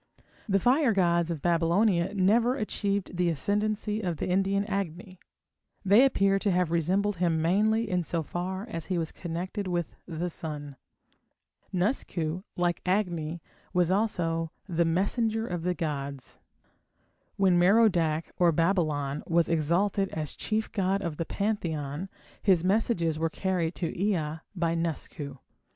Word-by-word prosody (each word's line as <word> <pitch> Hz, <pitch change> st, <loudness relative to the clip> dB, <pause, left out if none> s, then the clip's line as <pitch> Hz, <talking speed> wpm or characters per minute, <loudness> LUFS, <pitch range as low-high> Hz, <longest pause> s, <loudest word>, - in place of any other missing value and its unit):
The 195 Hz, -, +4 dB
fire 250 Hz, -, +3 dB
gods 170 Hz, -3 st, +2 dB
of 165 Hz, -4 st, -4 dB
Babylonia 175 Hz, +3 st, +2 dB
never 225 Hz, +6 st, +3 dB
achieved 200 Hz, -6 st, -2 dB
the 180 Hz, -1 st, +2 dB
ascendancy 210 Hz, +6 st, -1 dB
of 175 Hz, -5 st, -2 dB
the -, -, -3 dB
Indian 195 Hz, +2 st, +1 dB
Agni; 185 Hz, -2 st, -4 dB, 0.7 s
they 205 Hz, +6 st, +7 dB
appear 195 Hz, -7 st, +3 dB
to 205 Hz, -, 0 dB
have 180 Hz, -3 st, +1 dB
resembled 185 Hz, +4 st, +1 dB
him 170 Hz, -2 st, +1 dB
mainly 215 Hz, +7 st, +2 dB
in 180 Hz, -2 st, 0 dB
so 165 Hz, 0 st, -2 dB
far 185 Hz, +6 st, -4 dB
as 165 Hz, -8 st, -6 dB
he 185 Hz, -, -1 dB
was 165 Hz, -1 st, -2 dB
connected 185 Hz, +4 st, -4 dB
with 175 Hz, -3 st, -2 dB
the 170 Hz, 0 st, -3 dB
sun. 145 Hz, -3 st, -6 dB, 1.0 s
Nusku, 180 Hz, -, -1 dB, 0.2 s
like 175 Hz, -1 st, 0 dB
Agni, 175 Hz, -4 st, -1 dB, 0.3 s
was 180 Hz, -1 st, +2 dB
also 170 Hz, -6 st, 0 dB, 0.2 s
the 170 Hz, -2 st, +1 dB
"messenger 220 Hz, +6 st, 0 dB
of 175 Hz, -5 st, -3 dB
the 180 Hz, +1 st, -1 dB
gods". 140 Hz, -5 st, -5 dB, 1.0 s
When 185 Hz, -3 st, +4 dB
Merodach 175 Hz, -5 st, +3 dB
or 175 Hz, -1 st, +5 dB
Babylon 155 Hz, -4 st, 0 dB
was 170 Hz, 0 st, +3 dB
exalted 175 Hz, +5 st, +1 dB
as 155 Hz, -2 st, -4 dB
chief 220 Hz, 0 st, -2 dB
god 195 Hz, 0 st, 0 dB
of 165 Hz, -4 st, -3 dB
the 165 Hz, -, -2 dB
pantheon 170 Hz, -6 st, -2 dB, 0.3 s
his 185 Hz, -5 st, +3 dB
messages 185 Hz, -5 st, +1 dB
were 165 Hz, 0 st, +1 dB
carried 175 Hz, -1 st, -1 dB
to 170 Hz, -3 st, -3 dB
Ea 165 Hz, -5 st, -1 dB, 0.2 s
by 170 Hz, -2 st, 0 dB
Nusku. 160 Hz, -4 st, -4 dB
180 Hz, 140 wpm, -28 LUFS, 165-200 Hz, 1.0 s, they